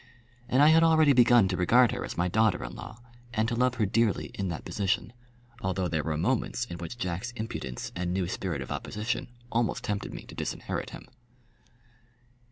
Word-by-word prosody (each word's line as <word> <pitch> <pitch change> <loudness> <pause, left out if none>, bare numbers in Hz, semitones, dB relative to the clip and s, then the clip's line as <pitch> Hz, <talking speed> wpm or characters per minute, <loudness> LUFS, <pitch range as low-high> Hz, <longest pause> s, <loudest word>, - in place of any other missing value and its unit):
And 130 +3 +4
I 150 - +8
had 160 +1 +6
already 160 -3 +5
begun 120 -4 +6
to 90 - 0
regard 115 +7 +4
her - - -3
as - - -6
my 90 +1 +2
daughter 105 0 +2
in - - -6
law, 110 - -9 0.4
and 110 0 +2
to 120 - -1
love 125 +1 +2
her 110 -3 +1
dearly 110 +1 +1
in 100 - -3
that 85 -3 -5
position, 105 +2 -1 0.5
although 95 -3 -1
there 80 -3 -1
were 80 -2 -2
moments 125 +6 0
in 85 -7 -8
which 90 +8 -6
Jack's 95 0 -3
impudence 110 - -5
and 90 0 -2
new 90 -1 0
spirit 85 -6 -3
of - - -10
opposition 105 +2 -3 0.2
almost 115 -1 0
tempted 100 -1 -3
me - - -8
to - - -12
disinherit - - -4
him. - - -10
105 Hz, 190 wpm, -28 LUFS, 90-120 Hz, 0.5 s, I